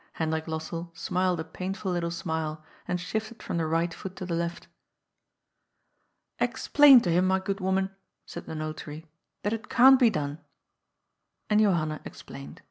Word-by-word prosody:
Hendrik 160 0 -2
Lossell 165 +2 -4
smiled 180 0 0
a - - -2
painful 185 +4 -4
little 175 -1 -1
smile, 160 -3 -3 0.2
and 180 0 -1
shifted 220 +6 -4
from - - -3
the 165 -1 0
right 165 +1 0
foot 190 +1 -8
to 185 - -6
the 175 - -3
left. 170 0 -3 1.7
"Explain 285 -4 +6
to 175 - 0
him, 180 +2 +3
my 190 0 +3
good 195 +1 -3
woman," 190 0 0 0.3
said - - -9
the 160 - -5
Notary, 155 0 -6 0.2
" - - -53
that 205 - 0
it 225 -1 -6
can't 265 +2 +7
be 245 -3 +6
done." 145 -5 -3 1.1
And 210 - +5
Johanna 165 -7 +1
explained. 70 +1 -10
175 Hz, 160 wpm, -27 LUFS, 160-195 Hz, 1.7 s, can't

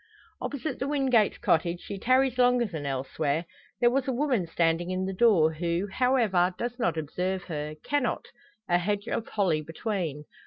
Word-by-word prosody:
Opposite 285 +2 -4
the 270 - -1
Wingates' 265 -7 +2
cottage 170 +1 +1
she 200 - -7
tarries 255 +2 +2
longer 245 -1 +4
than 160 -8 -5
elsewhere. 140 +4 -1 0.3
There 240 0 +4
was 270 +2 0
a - - +1
woman 250 - 0
standing 165 +1 +1
in 185 0 -1
the 190 - -3
door, 185 -7 +4
who, 170 +4 -1
however, 215 -9 +2
does 240 +3 -4
not 170 -8 0
observe 180 +5 -2
her 150 -3 -5
cannot 285 -5 -1 0.4
a 175 0 +3
hedge 205 +3 -2
of 230 - -2
holly 180 -7 +1
between. 160 -2 -4
190 Hz, 165 wpm, -27 LUFS, 165-245 Hz, 0.4 s, longer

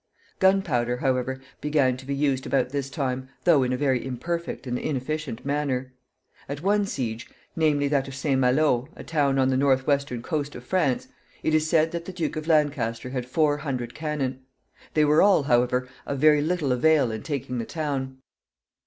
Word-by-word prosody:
Gunpowder, 150 -12 +2
however, 130 0 -1 0.2
began 145 -4 +2
to 130 +1 -12
be 140 - -1
used 140 -2 0
about 130 -2 +1
this 140 0 -3
time, 130 -1 -3
though 165 -6 +5
in 125 -1 0
a 125 - 0
very 130 -3 +1
imperfect 170 +6 -4
and 125 -1 -2
inefficient 145 -2 -3
manner. 135 -3 -1 0.6
At 145 +2 -5
one 205 +1 +2
siege, 115 -8 -4 0.3
namely, 150 -3 +2
that 140 -2 +1
of 135 - -7
St. 135 -1 0
Malo, 130 -1 +2
a - - -9
town 140 -4 +1
on 130 -1 +3
the 130 - +2
northwestern 135 -2 +1
coast 145 0 -3
of 125 - -8
France, 145 -3 0 0.4
it 155 - +1
is 155 0 +2
said 160 0 +3
that 170 0 -4
the 190 - -7
Duke 175 -3 -2
of 155 0 -5
Lancaster 135 -7 +1
had 125 -2 -3
four 145 +2 +2
hundred 130 -5 -4
cannon. 145 -4 -3 0.6
They 155 -1 +5
were 150 +1 +5
all, 195 -7 +5
however, 125 0 +2 0.2
of 140 - -2
very 150 +1 +5
little 155 -3 0
avail 140 0 +3
in 110 -1 -5
taking 130 -4 -3
the 115 - -3
town. 135 -4 -3
140 Hz, 180 wpm, -25 LUFS, 125-155 Hz, 0.6 s, though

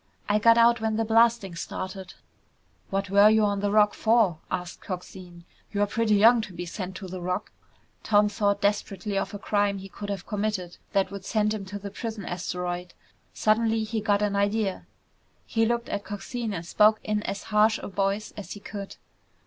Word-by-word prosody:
I 210 0 +2
got 230 +2 +6
out 235 0 +5
when 220 -1 0
the 225 +1 0
blasting 225 -3 +3
started." 185 +2 -6 0.7
"What 195 0 -2
were 200 +1 +7
you 220 0 +4
on 200 -1 0
the 205 0 0
Rock 210 0 +4
for?" 220 -8 +2
asked 180 0 -4
Coxine. 180 -2 -8 0.3
"You're 205 0 +1
pretty 215 +1 +1
young 230 +3 +6
to 205 -4 -8
be 175 +1 -5
sent 185 +1 -6
to 190 - -7
the 185 0 -7
Rock." 180 +3 -3 0.5
Tom 210 -1 +4
thought 200 -1 0
desperately 200 -1 -1
of 195 +1 -2
a - - -3
crime 205 -1 0
he 195 0 -8
could 205 +2 -7
have 195 -2 -4
committed 205 -4 -3 0.2
that 195 -1 +1
would 200 -1 -7
send 215 +1 +1
him 205 -3 -5
to 195 +2 -6
the 200 0 -7
prison 220 -2 -5
asteroid. 180 0 -4 0.4
Suddenly 220 +1 +2
he 220 0 -2
got 205 -1 +2
an 205 -1 0
idea. 200 0 0 0.6
He 225 -1 +1
looked 235 0 -1
at 200 - -3
Coxine 220 +3 -5
and 165 0 -5
spoke 215 +5 +4
in 210 0 -1
as 200 - -4
harsh 215 +1 +4
a - - -7
voice 200 +1 -1
as 205 - -7
he 205 - -9
could. 200 -1 -7
205 Hz, 190 wpm, -26 LUFS, 190-215 Hz, 0.7 s, were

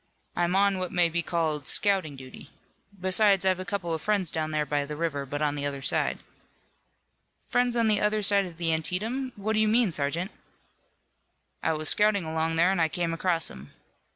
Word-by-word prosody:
"I'm 175 +1 0
on 200 -1 +3
what 185 -1 -4
may 175 -1 +2
be 170 +1 -1
called 160 -4 -2
scouting 190 -8 +2
duty. 130 -1 -12 0.5
Besides, 190 +1 +3
I've 185 -1 +2
a 185 - -5
couple 195 -4 -3
of 160 - -3
friends 200 -6 +1
down 155 -1 -2
there 155 -1 -1
by 145 -1 -1
the 150 +1 -6
river, 150 -3 -3
but 145 +3 -3
on 145 -1 +1
the 145 -1 -4
other 140 -1 -6
side." - - +1 1.2
"Friends 245 -1 0
on 230 -1 +3
the 210 -1 +2
other 210 0 +1
side 200 -1 +4
of 170 -2 -12
the 165 -1 0
Antietam. 220 - -1
What 210 +2 -2
do 215 - +1
you 215 - +3
mean, 225 -2 +3
sergeant?" 165 +6 -2 1.3
"I - - 0
was 155 0 -1
scouting 210 -4 +3
along 160 +1 -1
there 170 +3 +3
and 195 -3 0
I 160 - +3
came 170 0 -2
across 165 -1 -1
'em. 70 +2 -13
175 Hz, 200 wpm, -27 LUFS, 155-200 Hz, 1.3 s, side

